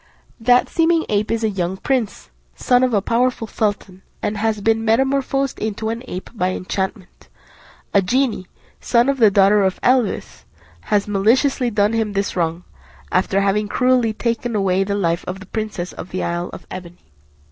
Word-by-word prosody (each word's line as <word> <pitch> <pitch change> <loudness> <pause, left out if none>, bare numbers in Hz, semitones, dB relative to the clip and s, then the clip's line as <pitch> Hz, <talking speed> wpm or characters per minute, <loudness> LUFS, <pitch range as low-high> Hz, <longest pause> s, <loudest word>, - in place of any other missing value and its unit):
That 245 +2 +4
seeming 330 0 +2
ape 210 0 0
is 230 0 -1
a 220 - +2
young 185 -1 -2
prince, 225 - -2 0.2
son 245 - +2
of 255 - +2
a 205 -3 +1
powerful 240 +1 +1
sultan, 205 -4 -3 0.2
and 210 - -2
has 215 0 0
been 225 +2 +1
metamorphosed 270 +3 +1
into 220 +1 -3
an 230 +1 -3
ape 185 +1 -7
by 185 -5 -1
enchantment. 190 +1 -5 0.6
A 200 - +5
genie, 230 -1 0 0.3
son 240 +2 +2
of 275 -1 0
the 220 -3 +7
daughter 200 +1 +4
of 190 -1 0
Eblis, 250 -4 +1 0.4
has 205 -1 +1
maliciously 240 +6 +2
done 210 0 +1
him 220 -2 -1
this 200 0 -1
wrong, 170 0 -1 0.5
after 190 +1 +1
having 205 +1 +1
cruelly 250 0 +2
taken 235 +1 -2
away 195 -2 +2
the 200 +1 -2
life 170 -3 0
of 185 +1 -4
the 190 - -11
princess 210 -3 -4
of - - -8
the 185 - -3
isle 175 +1 -2
of - - -10
Ebene." 175 -1 -8
210 Hz, 170 wpm, -20 LUFS, 190-235 Hz, 0.6 s, the